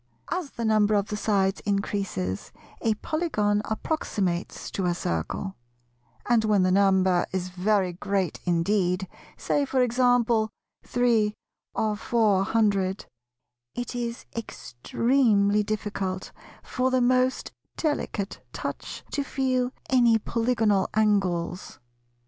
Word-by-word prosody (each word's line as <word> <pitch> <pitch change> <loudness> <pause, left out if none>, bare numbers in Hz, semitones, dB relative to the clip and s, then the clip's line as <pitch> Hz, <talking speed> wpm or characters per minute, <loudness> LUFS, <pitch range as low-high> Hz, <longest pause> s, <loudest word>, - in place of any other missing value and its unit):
As 355 -5 -2
the 235 - -4
number 215 -1 +3
of 200 0 0
the 210 - -2
sides 200 -2 +1
increases, 195 - -2 0.3
a 220 -1 +2
Polygon 210 -8 0
approximates 205 - -2
to 190 - -2
a 175 - +1
Circle; 170 - -3 0.7
and, 235 -2 +3
when 210 -3 +3
the 185 - +3
number 190 -2 +3
is 185 -1 -2
very 185 0 +1
great 190 -1 -1
indeed, 180 +1 +1 0.3
say 290 - 0
for 265 -2 +2
example 240 -2 +3 0.3
three 230 -4 +2 0.4
or 215 -1 0
four 210 -3 +2
hundred, 195 -2 +1 0.7
it 245 0 -4
is 235 0 -4
extremely 210 - +1
difficult 205 -3 -3 0.3
for 255 0 0
the 260 0 +2
most 255 +1 +2 0.3
delicate 260 -10 -2
touch - - -5
to 285 - -1
feel 255 -2 0 0.2
any 240 -3 +5
polygonal 225 -3 +1
angles. 190 -5 0
210 Hz, 115 wpm, -26 LUFS, 190-240 Hz, 0.7 s, any